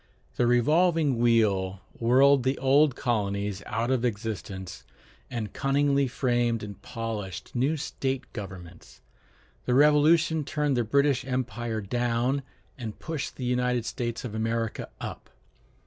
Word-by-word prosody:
The 120 - +2
revolving 150 +2 +3
wheel 100 -5 +2 0.2
whirled 135 +4 +5
the 130 +2 0
old 135 +1 +4
colonies 100 -4 -1
out 120 +1 -1
of 130 -2 +1
existence, 100 -5 -4 0.5
and 110 -5 -4
cunningly 140 0 +2
framed 120 -3 0
and 100 -2 -8
polished 110 -7 -5
new 135 +6 +1
state 135 -3 -3
governments. 95 -6 -9 0.6
The 125 - +1
Revolution 150 +3 +4
turned 145 -1 0
the 120 - +1
British 140 +3 +2
empire 120 -3 -3
down, 120 +5 0 0.4
and 110 -3 -6
pushed 160 -3 -5
the 130 - -5
United 125 -1 0
States 120 0 -3
of 115 - -5
America 115 0 -2
up. - - -7
120 Hz, 125 wpm, -27 LUFS, 110-135 Hz, 0.6 s, whirled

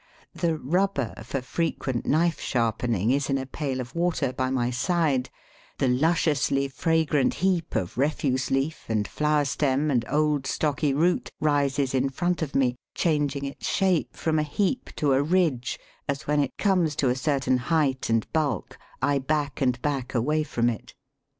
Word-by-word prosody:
The 165 -2 0
"rubber" 150 - 0
for 130 +3 -4
frequent 135 -4 -2
knife 165 0 +2
sharpening 115 -2 0
is 140 +1 0
in 135 - +2
a 135 - -3
pail 135 -1 -3
of 120 -2 -6
water 170 -6 0
by 130 0 -1
my 125 -2 0
side; 140 -1 +1 0.5
the 135 - +1
lusciously 140 0 +2
fragrant 150 -1 +1
heap 180 -3 0
of 90 +6 -2
refuse 135 -2 0
leaf 135 +4 -1
and 110 -2 0
flower 150 -1 +1
stem 140 +1 +1
and 120 -4 +2
old 150 -2 +1
stocky 150 0 0
root 165 +6 +1
rises 140 -3 +1
in 135 +1 +2
front 175 +6 -1
of 150 -3 -3
me, 125 -2 +2 0.2
changing 145 -4 0
its 140 - -5
shape 190 -4 +1
from 160 -1 0
a - - +3
heap 200 - -1
to 145 -3 +2
a 135 - +3
ridge, 155 -6 +1 0.3
as 140 0 -2
when 150 0 +1
it 140 -2 -1
comes 180 -7 +2
to 135 - +1
a 125 - +1
certain 135 -2 +1
height 135 -1 0
and 115 -1 +2
bulk 155 -3 -1 0.2
I 140 +1 +3
back 145 0 -1
and 125 -2 +2
back 135 -3 -2
away 150 +7 +2
from 120 -6 0
it. 110 - -9
140 Hz, 170 wpm, -26 LUFS, 130-155 Hz, 0.5 s, a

